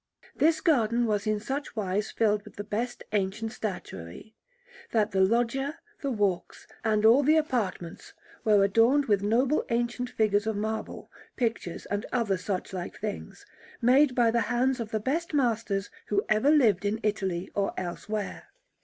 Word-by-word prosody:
This 315 +1 +3
garden 240 -7 +2
was 210 -1 -1
in 215 -1 +1
such 270 +5 -4
wise 205 0 -1
filled 210 -2 +1
with 210 - -14
the 205 - -5
best 235 +4 -3
ancient 210 +2 -1
statuary, 185 - -7 0.6
that 215 -2 +1
the 190 -1 +2
loggia, 240 +8 +1 0.2
the 280 - -1
walks, 205 -7 -1 0.2
and 215 -1 +2
all 235 +5 +7
the 305 +3 +4
apartments 220 - -2 0.3
were 210 -2 +5
adorned 230 +8 +4
with 205 -5 +2
noble 245 +8 +2
ancient 240 +1 -1
figures 210 -2 +1
of 220 - 0
marble, 220 +2 -4 0.2
pictures, 225 -8 -2
and 205 +1 -3
other 230 -6 +1
suchlike 185 -1 -4
things, 210 -1 -6 0.3
made 260 +2 +4
by 235 -2 +4
the 235 0 +2
hands 250 +3 +1
of 225 -2 -4
the 220 - -1
best 300 +8 -2
masters 225 -7 0 0.2
who 205 0 0
ever 215 +6 +3
lived 230 - +4
in 205 +2 -1
Italy 190 -4 -1
or 200 -1 0
elsewhere. 200 +3 -5
220 Hz, 155 wpm, -28 LUFS, 205-245 Hz, 0.6 s, all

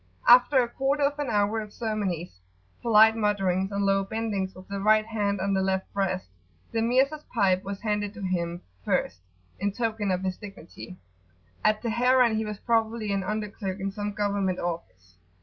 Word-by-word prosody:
After 250 +3 +7
a - - -2
quarter 275 +4 0
of 285 +1 0
an 290 -3 -2
hour 210 0 +1
of 210 -1 -9
ceremonies, 195 - -3 0.4
polite 220 -1 +6
mutterings 195 -3 0
and 200 0 -1
low 195 0 +2
bendings 200 -2 -3
with 185 0 -13
the 200 0 -4
right 215 +2 +4
hand 205 -3 -1
on 195 +1 0
the 190 - +2
left 190 0 -1
breast, 195 -2 -1 0.4
the 225 - 0
Mirza's 265 +6 +2
pipe 190 -5 +2
was 200 0 -6
handed 210 -2 -1
to 210 - -8
him 175 -2 -2 0.2
first, 90 - -1 0.4
in 200 +2 0
token 220 -2 -2
of 185 0 0
his 185 -1 -2
dignity 190 -2 -11 0.7
at 215 +1 +2
Teheran 245 0 +3
he 220 0 -1
was 210 -1 -5
probably 225 -1 0
an 195 -1 -1
under 215 +1 -2
clerk 195 -1 -5
in 195 +1 -2
some 205 +1 -4
government 200 -3 0
office. 95 - -6
205 Hz, 180 wpm, -26 LUFS, 190-225 Hz, 0.7 s, After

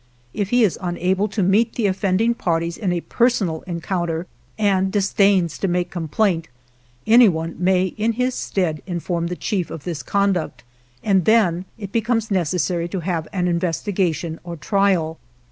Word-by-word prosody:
If 200 -2 -2
he 245 +1 +4
is 200 - +1
unable 185 +3 0
to 200 -1 -1
meet 215 +5 +2
the 230 - 0
offending 195 +3 +1
parties 170 -5 -1
in 195 -5 -2
a 175 -1 -1
personal 210 -10 +1
encounter, 170 -1 -2 0.3
and 195 -3 +2
disdains 195 -4 +2
to 195 - 0
make 180 0 -1
complaint, 170 +1 0 0.6
anyone 185 -9 +4
may 185 0 +3 0.2
in 225 +2 +1
his 250 +2 0
stead 170 -10 -2
inform 170 -1 -2
the 180 - -3
chief 185 -1 -2
of 160 -4 -7
this 165 -4 -4
conduct, 190 -11 0 0.4
and 190 -5 +2
then 190 -6 +3
it 200 -3 -7
becomes 225 0 0
necessary 175 -1 0
to 180 +1 -4
have 165 -2 -2
an 180 -3 0
investigation 170 -1 -1
or 170 -1 -6
trial. 185 -3 +1
185 Hz, 155 wpm, -21 LUFS, 170-205 Hz, 0.6 s, he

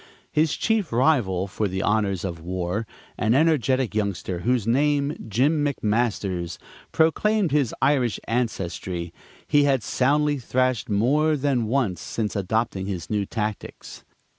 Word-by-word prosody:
His 155 0 +2
chief 220 -5 0
rival 115 - +2
for 100 +2 -2
the 95 +1 -3
honors 100 -4 0
of 85 -3 -4
war, 90 +5 -3 0.3
an 110 +3 +2
energetic 135 -5 +2
youngster, 100 -4 -2
whose 120 +2 0
name, 140 +4 +1
Jim 145 +8 +2
McMasters, 105 - -1 0.3
proclaimed 190 +4 +2
his 140 -5 +1
Irish 125 -7 +2
ancestry, 95 -7 -3 0.3
he 145 -1 +3
had 135 -5 +2
soundly 145 +5 +1
thrashed 130 -2 0
more 145 +9 +2
than 130 -5 0
once 110 -8 0
since 110 -2 -3
adopting 100 0 -1
his 90 -3 -5
new 105 -2 0
tactics. 105 -2 -5
115 Hz, 130 wpm, -24 LUFS, 100-140 Hz, 0.3 s, he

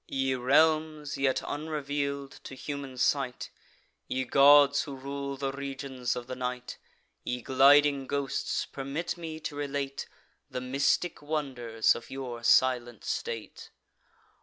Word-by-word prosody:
Ye 135 -1 0
realms, 155 +3 +2
yet 135 -1 +1
unreveal'd 145 -2 -3
to 135 - -8
human 140 -1 -6
sight, 130 -1 0 0.6
Ye 130 0 -1
gods 145 +1 +6
who 140 - -6
rule 140 +1 -5
the 135 0 -2
regions 135 -2 -4
of 125 - -5
the 130 - -6
night, 125 0 -5 0.4
Ye 125 -1 -3
gliding 140 +1 +5
ghosts, 140 -1 -1
permit 140 +5 -4
me 165 -2 -7
to 150 - -5
relate 140 -1 -3 0.4
The - - -4
mystic 140 +7 0
wonders 130 -7 0
of 120 - -9
your 125 -3 -6
silent 120 -2 +3
state! 115 -2 -5
140 Hz, 125 wpm, -29 LUFS, 130-145 Hz, 0.6 s, gods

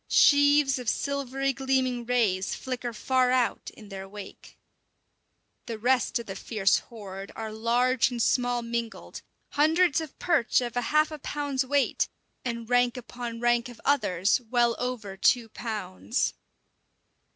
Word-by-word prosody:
Sheaves 285 -1 +5
of 245 -3 -2
silvery 275 -1 -1
gleaming 260 -3 0
rays 210 -7 +1
flicker 250 -2 -4
far 255 +3 +1
out 250 -2 +1
in 210 -2 -13
their 195 -1 -8
wake. 205 0 -11 1.1
The 230 -2 -4
rest 245 +2 +2
of 235 - -6
the 195 - -6
fierce 195 -1 +1
horde 195 -4 -9
are 220 -1 -5
large 240 +4 +2
and 245 -2 -5
small 245 0 +1
mingled 235 0 -5 0.3
hundreds 320 +2 +3
of 315 -3 -9
perch 320 -10 +2
of 240 -2 -3
half 305 +6 +2
a 305 - -7
pound's 285 -2 -2
weight, 280 +1 +1 0.3
and 235 -2 -4
rank 245 0 +2
upon 240 -1 -6
rank 240 +1 +2
of 240 - -12
others 215 -6 +2
well 240 -1 +3
over 230 -6 -4
two 230 +3 +3
pounds. 210 - -3
245 Hz, 140 wpm, -27 LUFS, 225-265 Hz, 1.1 s, Sheaves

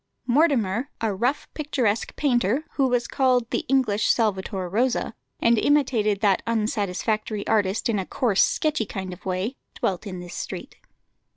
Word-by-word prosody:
Mortimer, 255 - +2
a 220 -2 0
rough, 245 +9 -1
picturesque 255 -8 -1
painter, 250 0 +1
who 270 -2 +2
was 245 -2 +1
called 255 -3 +2
"the - - 0
English 245 -6 +2
Salvator 195 -4 0
Rosa," 235 +5 0 0.3
and 230 -1 +4
imitated 235 -8 +2
that 200 -4 +3
unsatisfactory 215 -1 -1
artist 210 +1 +1
in 220 -4 +1
a 190 - -3
coarse, 220 -6 +2
sketchy 305 -9 0
kind 190 -2 -5
of 180 - -11
way, 190 +8 -2 0.2
dwelt 190 +2 -2
in 185 -2 -6
this 175 0 -9
street. - - -6
220 Hz, 150 wpm, -24 LUFS, 200-255 Hz, 0.3 s, and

